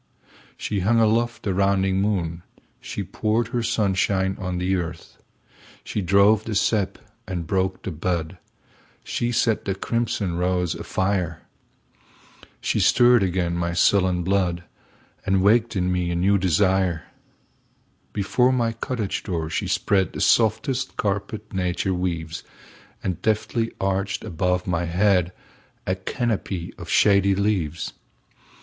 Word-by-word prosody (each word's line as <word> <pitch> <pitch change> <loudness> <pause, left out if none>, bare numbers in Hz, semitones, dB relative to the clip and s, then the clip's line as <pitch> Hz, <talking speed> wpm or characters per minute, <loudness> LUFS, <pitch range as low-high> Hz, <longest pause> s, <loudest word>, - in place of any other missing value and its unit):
She 105 - -2
hung 110 +5 +3
aloft 115 +1 +1
the 100 - 0
rounding 95 0 +2
moon, 90 -5 -1 0.4
She - - -5
poured 110 +1 -1
her 120 0 -1
sunshine 95 -3 +1
on 90 -1 -3
the 90 +2 0
earth, 85 -2 -6 0.6
She 105 - -3
drove 100 +3 +4
the 110 - -3
sap 100 -1 +1 0.3
and 90 -3 -3
broke 95 +2 -1
the 95 - -4
bud, 85 +2 -3 0.6
She 120 0 -2
set 115 -2 +1
the 95 - -1
crimson 100 -4 -1
rose 90 -2 0
afire. 95 -4 -2 1.2
She - - 0
stirred 120 -1 +5
again 90 -2 0
my 85 0 -1
sullen 90 0 +3
blood, 90 -2 0 0.6
And 95 -1 +1
waked 110 +2 +3
in 90 -1 0
me 90 -1 0
a 85 - -1
new 95 +3 +3
desire. 95 -1 +2 1.1
Before 125 +5 +2
my 120 -3 +1
cottage 115 -2 -3
door 80 -3 -3
she - - -1
spreadThe 95 -2 +1
softest 120 +4 +2
carpet 105 +1 -3
nature 95 0 -1
weaves, 85 -3 -3 0.6
And 90 -3 -3
deftly 110 +1 0
arched 95 +1 -1
above 90 -2 -1
my 85 -1 -1
headA 90 +1 +2 0.7
canopy 105 -8 -2
of - - -8
shady 100 -1 +4
leaves. 95 -6 -1
95 Hz, 125 wpm, -23 LUFS, 90-105 Hz, 1.2 s, stirred